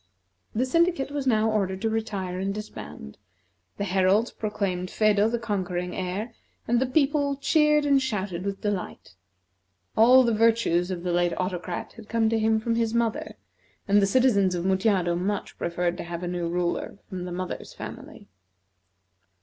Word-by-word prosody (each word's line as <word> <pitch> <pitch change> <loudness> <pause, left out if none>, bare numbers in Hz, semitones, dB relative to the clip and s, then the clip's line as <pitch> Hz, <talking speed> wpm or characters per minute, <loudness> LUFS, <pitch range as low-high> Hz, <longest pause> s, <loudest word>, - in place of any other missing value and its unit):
The 245 +4 +2
syndicate 335 -1 +1
was 285 -2 -3
now 220 -2 +3
ordered 190 -3 0
to 225 - +2
retire 195 -5 -3
and 195 +1 -1
disband; 200 - -8 0.6
the - - -2
heralds 195 +4 +2
proclaimed 195 -4 -3
Phedo 215 +1 +3
the 235 - 0
conquering 185 -5 -3
heir, 190 +6 -3 0.3
and 240 0 +3
the 260 - +1
people 285 +1 +2
cheered 300 +1 +3
and 280 -1 +4
shouted 195 -8 -3
with 200 0 -4
delight. 205 - -4 0.8
All 250 +4 +7
the 235 -2 +2
virtues 220 -6 +2
of 180 -2 -4
the 180 -1 -1
late 175 0 +2
Autocrat 180 -1 -3
had 220 -2 -12
come 225 -1 +2
to 225 0 +1
him 220 0 +2
from 230 +1 -1
his 230 0 0
mother, 230 -2 -1 0.5
and 205 0 +5
the 195 - +3
citizens 200 -5 +3
of 175 0 -3
Mutjado 190 -2 +2
much 195 +4 -2
preferred 175 0 -1
to - - -5
have 170 0 -6
a - - -2
new 175 -1 -2
ruler 175 +2 -2
from 180 -1 -6
the 180 - -6
mother's 180 +1 -5
family. - - -9
205 Hz, 165 wpm, -26 LUFS, 180-230 Hz, 0.8 s, All